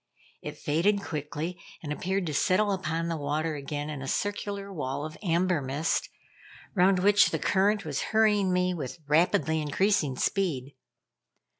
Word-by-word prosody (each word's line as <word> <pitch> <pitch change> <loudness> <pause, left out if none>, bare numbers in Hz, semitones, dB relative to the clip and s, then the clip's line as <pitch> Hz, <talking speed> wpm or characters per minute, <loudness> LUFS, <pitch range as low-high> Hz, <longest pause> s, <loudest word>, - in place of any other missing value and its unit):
It - - -7
faded 195 +7 +1
quickly, 155 +3 -4 0.2
and 150 -1 -3
appeared 190 +4 -1
to 155 - -3
settle 195 +7 +2
upon 165 -3 -2
the 165 -1 -2
water 155 +2 -1
again 145 0 -4
in 145 -3 -6
a 135 - -5
circular 200 +2 -3
wall 145 -2 -3
of 155 - -7
amber 175 -3 +1
mist, 140 +5 -1 0.6
round 190 0 +4
which 205 +3 +5
the - - -1
current 200 +1 +1
was 145 -3 -2
hurrying 210 -3 +3
me 180 0 +1
with 150 -3 -5
rapidly 160 0 +2
increasing 150 -1 +1
speed. 145 -5 -1
165 Hz, 150 wpm, -28 LUFS, 150-195 Hz, 0.6 s, which